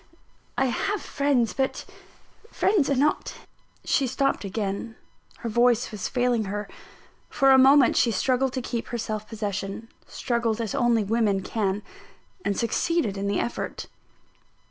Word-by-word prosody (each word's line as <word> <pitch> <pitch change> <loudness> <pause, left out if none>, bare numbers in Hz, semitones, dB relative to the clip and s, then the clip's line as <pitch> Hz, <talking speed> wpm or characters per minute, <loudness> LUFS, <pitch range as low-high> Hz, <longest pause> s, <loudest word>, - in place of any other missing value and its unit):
I 270 - +3
have 390 - -1
friends, 280 -8 0
but 265 -1 -2 0.6
friends 385 - +2
are 280 - +2
not 290 +4 0 0.2
" - - -35
She 270 - +2
stopped 275 +1 0
again; 200 +3 -4 0.5
her 235 - -4
voice 240 +1 +2
was 210 -4 -4
failing 245 -3 +1
her. 205 +1 -4 0.6
For 270 0 +4
a 265 - +7
moment, 270 0 +6
she 240 - +3
struggled 255 +5 +1
to 255 - -3
keep 235 -2 -4
her 240 - -4
self 215 -1 -4
possession 205 0 -4 0.2
struggled 235 -2 -1
as 225 -4 -3
only 235 -3 +2
women 205 -2 +1
can 205 -2 -1 0.6
and 200 -2 -1
succeeded 235 - 0
in 200 0 -3
the 200 - 0
effort. 240 - -4
235 Hz, 145 wpm, -25 LUFS, 210-265 Hz, 0.6 s, a